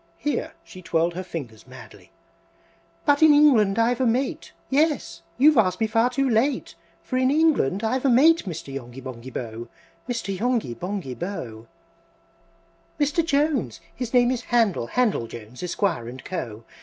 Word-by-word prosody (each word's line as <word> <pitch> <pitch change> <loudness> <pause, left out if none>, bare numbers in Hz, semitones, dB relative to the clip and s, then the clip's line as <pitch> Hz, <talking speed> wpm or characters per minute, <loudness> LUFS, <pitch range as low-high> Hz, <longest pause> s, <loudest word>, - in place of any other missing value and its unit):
(Here 295 - -2
she 185 - -12
twirled 170 0 0
her 180 - -4
fingers 125 - -8
madly,) 130 - -14 0.9
"But 290 0 +3
in 310 -2 +7
England 235 -9 +5
I've 235 +2 +2
a - - +3
mate! 250 +4 -1 0.2
Yes! 285 - 0 0.2
you've 290 0 +6
asked 185 -4 +2
me 225 - +2
far 225 +2 +2
too 270 +2 0
late, 250 +3 0 0.3
For 255 - -3
in 255 0 +3
England 280 - +2
I've 250 +3 0
a 275 - +3
mate, 305 +6 +5
Mr. 160 -5 -6
Yonghy 125 -1 -7
Bonghy 130 -1 -8
Bò! 115 -2 -6 0.4
Mr. 230 -5 -3
Yonghy 235 - 0
Bonghy 180 - -5
Bò! 120 - -6 1.3
VI. 295 - +3
"Mr. 300 +4 0
Jones 285 - 0
(his 250 -2 -5
name 245 -1 +4
is 250 -2 -3
Handel, 225 - +1
Handel 220 - 0
Jones, 115 +2 -10
Esquire, 170 - -2
& - - -25
Co.) 115 -12 -5
220 Hz, 160 wpm, -24 LUFS, -, 1.3 s, in